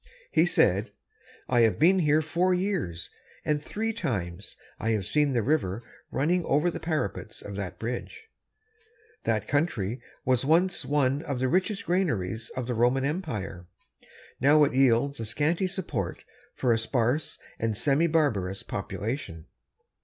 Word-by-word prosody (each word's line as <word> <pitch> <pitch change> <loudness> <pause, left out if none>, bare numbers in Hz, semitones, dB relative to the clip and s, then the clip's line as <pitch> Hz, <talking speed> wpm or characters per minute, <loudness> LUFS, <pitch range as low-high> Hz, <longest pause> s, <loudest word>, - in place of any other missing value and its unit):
He - - +4
said: - - +2 0.5
"I 125 - +2
have 115 -2 +4
been 185 +5 +5
here 155 -1 +3
four 180 +4 +2
years, 180 - -2 0.3
and 150 -1 +1
three 220 +8 -3
times 100 - -3 0.2
I 110 - -1
have 105 -4 -1
seen 150 +3 +2
the 120 -3 +1
river 120 -7 0 0.3
running 170 +6 +1
over 150 +6 +2
the - - -5
parapets 155 - -3
of 100 - -7
that 100 -3 -5
bridge. 125 - -5 1.0
That - - 0
country 125 - 0 0.2
was 130 -1 +2
once 170 +6 +2
one 140 0 +1
of 140 -4 -3
the 130 +1 +1
richest 190 - 0
granaries 115 - 0
of 130 -2 -2
the 125 - -2
Roman 125 +3 +2
empire. 110 - -4 0.3
It - - -25 0.3
now 150 +3 +6
yields 135 0 +2
a 115 - -3
scanty 155 - +1
support 150 - -3 0.3
for 125 -3 +2
a 115 - +1
sparse 120 +5 0 0.2
and 110 -2 -1
semi 140 +7 +2
barbarous 115 - 0
population." 105 - -4
135 Hz, 145 wpm, -27 LUFS, 110-160 Hz, 1.0 s, now